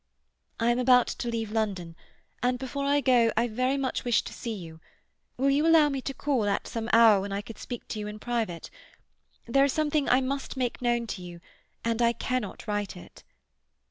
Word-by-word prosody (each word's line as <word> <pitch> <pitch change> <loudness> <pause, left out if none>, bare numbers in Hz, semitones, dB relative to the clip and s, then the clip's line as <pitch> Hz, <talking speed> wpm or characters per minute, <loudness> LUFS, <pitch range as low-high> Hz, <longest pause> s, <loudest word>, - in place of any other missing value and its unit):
"I 235 +1 +3
am 240 - 0
about 250 -1 +5
to - - -5
leave 225 -2 -3
London, 195 -7 -2 0.5
and 250 0 +1
before 270 +2 -4
I 285 +1 +3
go 240 -3 +4
I 235 +2 +3
very 255 +4 0
much 270 -2 -2
wish 240 -3 +2
to - - -8
see 230 -2 -5
you. 165 -4 -10 0.6
Will 275 +2 +2
you 295 +4 +2
allow 320 -2 +6
me 275 -2 -3
to 275 - -4
call 265 -7 0
at 200 -1 -1
some 230 -1 -4
hour 225 -3 +6
when 200 +1 -5
I 200 +1 -3
could 225 - -11
speak 245 -2 -7
to 215 - -4
you 210 - -4
in 210 0 -6
private? 220 -7 -3 0.7
There 275 +4 +3
is 280 - 0
something 305 -2 +1
I 250 - +5
must 270 +1 -3
make 250 -1 -2
known 240 -1 +1
to 205 -4 -6
you, 175 -1 -9 0.5
and 230 0 0
I 235 0 +4
cannot 245 -2 -3
write 205 -3 -3
it." 180 - -14
235 Hz, 205 wpm, -27 LUFS, 215-260 Hz, 0.7 s, allow